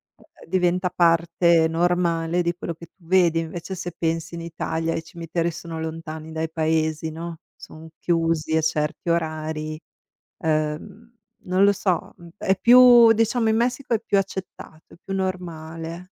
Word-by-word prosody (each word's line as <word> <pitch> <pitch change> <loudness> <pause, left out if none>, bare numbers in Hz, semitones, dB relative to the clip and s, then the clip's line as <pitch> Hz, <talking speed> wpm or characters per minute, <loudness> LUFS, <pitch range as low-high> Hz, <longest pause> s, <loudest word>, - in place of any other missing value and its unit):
e - - -23 0.2
ehm, - - -16
diventa 180 0 +1
parte 170 -1 +3
normale 170 0 +1
di 170 0 0
quello 170 -2 -5
che 170 - -12
tu 175 - -24
vedi. 170 -2 +3
Invece 165 +3 -5
se 175 -1 -6
pensi 165 0 -2
in 170 - -6
Italia 165 0 -3
i - - -2
cimiteri 170 0 -3
sono 165 0 -7
lontani 160 0 -6
dai 160 0 -3
paesi, 160 0 0
no, 165 +1 -7 0.2
son 160 +1 -12
chiusi 165 -2 0
a - - +2
certi 150 +2 -2
orari. 155 -1 -2 0.6
Ehm, 160 +9 -2 0.3
non 185 +2 +2
lo 200 - +5
so, 180 -3 -1 0.2
è 190 - +1
più 240 -1 +8
diciamo, 225 +1 +1
in 220 - +2
Messico 245 +2 -1
è - - -1
più 205 -3 +1
accettato, 190 -4 -7
è - - -23
più 195 - -5
normale. 170 -2 -5
170 Hz, 155 wpm, -23 LUFS, 160-185 Hz, 0.6 s, più